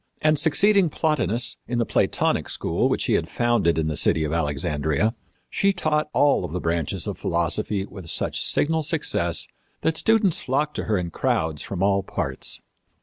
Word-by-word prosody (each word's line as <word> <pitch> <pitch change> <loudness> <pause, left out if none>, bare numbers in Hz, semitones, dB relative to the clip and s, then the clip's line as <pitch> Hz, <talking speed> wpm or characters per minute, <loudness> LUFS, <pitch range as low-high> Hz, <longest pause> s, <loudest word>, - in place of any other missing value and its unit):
And 155 -1 +3
succeeding 195 +4 +4
Plotinus, 125 - 0
in 120 - -2
the 120 - +1
Platonic - - 0
school - - 0
which - - 0
he - - 0
had - - 0
founded 120 -9 +1
in 80 - +1
the 75 - -2
city 80 - +3
of 75 0 -2
Alexandria, 75 +5 0 0.3
she 200 0 +1
taught 155 -4 0
all 140 -13 +2
the 90 +3 -4
branches 85 -3 -2
of - - -5
philosophy 95 +4 0
with 95 -4 -10
such - - 0
signal 160 +2 +1
success 150 - -1 0.4
that 160 0 0
students 220 -5 +2
flocked 145 +4 -1
to - - -3
her 110 -2 +1
in 85 -2 -3
crowds 80 -2 -1
from 95 +3 -4
all 100 0 +2
parts." 85 -8 -2
105 Hz, 170 wpm, -23 LUFS, -, 0.4 s, succeeding